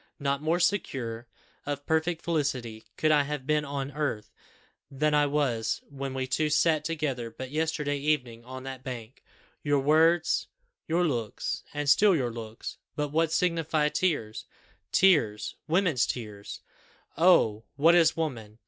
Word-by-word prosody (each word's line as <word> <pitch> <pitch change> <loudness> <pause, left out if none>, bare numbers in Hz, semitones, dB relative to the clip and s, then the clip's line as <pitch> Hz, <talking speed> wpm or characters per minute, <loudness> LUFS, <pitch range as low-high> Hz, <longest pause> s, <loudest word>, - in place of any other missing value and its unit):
not 140 -1 -1
more 160 +3 +1
secure 125 - -1 0.4
of 145 0 -4
perfect 160 +1 0
felicity 130 -9 -2
could 155 - +2
I 150 -1 +5
have 145 -1 -4
been 150 +1 +1
on 140 -1 -4
earth 145 -7 -3 0.6
than 150 +2 0
I 145 0 +4
was 135 -6 0
when 135 -1 -5
we 130 0 -1
two 140 +4 0
sat 155 0 +3
together 145 -7 -2
but 130 +3 -8
yesterday 150 -2 -1
evening 130 -6 -1
on 130 +1 -8
that 130 -1 -7
bank. 125 -1 -8 0.4
Your 145 -1 +2
words 160 +4 +3 0.4
your 170 +2 +2
looks 120 -9 -2
and 145 0 -3
still 195 +7 +5
your 125 -6 -1
looks 115 -1 -7 0.2
But 150 -1 -1
what 160 +2 +1
signify 160 -3 +1
tears! 145 -12 -1 0.5
Tears, 145 - +3
women's 165 - +2
tears! 105 -4 -6 0.5
Oh! 130 - +4
what 160 +5 +5
is 165 -2 +4
woman! 115 -10 -4
145 Hz, 145 wpm, -28 LUFS, 125-160 Hz, 0.6 s, I